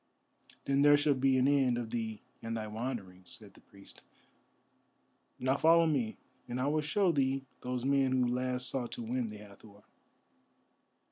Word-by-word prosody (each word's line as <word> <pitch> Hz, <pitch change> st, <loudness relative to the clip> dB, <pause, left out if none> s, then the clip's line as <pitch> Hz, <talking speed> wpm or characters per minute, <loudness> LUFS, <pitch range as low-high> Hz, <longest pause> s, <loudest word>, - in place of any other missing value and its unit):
"Then 140 Hz, 0 st, +2 dB
there 145 Hz, 0 st, +7 dB
shall 145 Hz, 0 st, +2 dB
be 135 Hz, 0 st, +2 dB
an 130 Hz, +1 st, +3 dB
end 135 Hz, -4 st, +2 dB
of 115 Hz, -2 st, -5 dB
thee 110 Hz, -2 st, -4 dB, 0.2 s
and 115 Hz, 0 st, -4 dB
thy 110 Hz, -, -4 dB
wanderings," 105 Hz, -5 st, -6 dB
said -, -, -15 dB
the -, -, -19 dB
priest. 100 Hz, 0 st, -16 dB, 1.4 s
"Now 130 Hz, +2 st, 0 dB
follow 165 Hz, +2 st, +5 dB
me, 130 Hz, -9 st, -1 dB, 0.3 s
and 120 Hz, +1 st, -4 dB
I 130 Hz, -, 0 dB
will 155 Hz, +2 st, +1 dB
show 180 Hz, +5 st, +1 dB
thee 135 Hz, -2 st, 0 dB, 0.2 s
those 125 Hz, 0 st, -3 dB
men 135 Hz, -1 st, +2 dB
who 130 Hz, -1 st, +2 dB
last 125 Hz, +1 st, -1 dB
sought 125 Hz, -3 st, -2 dB
to 120 Hz, -, -5 dB
win 120 Hz, +1 st, -2 dB
the 105 Hz, -1 st, -8 dB
Hathor." 105 Hz, 0 st, -15 dB
125 Hz, 165 wpm, -32 LUFS, 115-140 Hz, 1.4 s, there